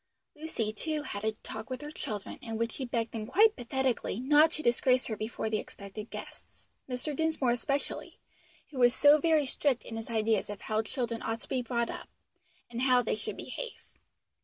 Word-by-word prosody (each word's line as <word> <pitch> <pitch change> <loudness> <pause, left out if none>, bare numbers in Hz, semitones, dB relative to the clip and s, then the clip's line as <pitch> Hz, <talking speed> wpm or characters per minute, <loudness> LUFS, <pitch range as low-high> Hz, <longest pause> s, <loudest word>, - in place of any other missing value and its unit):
Lucy, 295 -9 -2
too, 305 +6 -2
had 205 -7 -5
a 220 0 +1
talk 220 +3 -7
with 255 +1 -4
her 295 - -6
children, 210 -9 -5
in 225 -2 -4
which 230 0 0
she 265 - -4
begged 235 -2 -1
them 215 -2 -4
quite 425 - +5
pathetically, 255 -3 -1
not 295 +5 +6
to 310 -1 -3
disgrace 250 +2 +3
her 220 - -2
before 220 +1 -3
the 215 -1 +1
expected 205 +2 -8
guests, - - -10 0.2
Mr. 255 +4 -2
Dinsmore 315 -5 +2
especially, 275 +4 -2 0.5
who 270 - -5
was 245 0 +6
so 295 +1 +7
very 315 -1 +4
strict 270 -1 +1
in 225 - -6
his 225 - -6
ideas 220 -2 +1
of 205 -1 -6
how 215 0 0
children 235 -1 -3
ought 225 +1 -2
to - - -8
be 255 - +1
brought 235 -1 -1
up, - - -8 0.6
and 240 0 -4
how 255 -1 +5
they - - 0
should 215 - -4
behave. - - -6
245 Hz, 195 wpm, -31 LUFS, 225-285 Hz, 0.6 s, so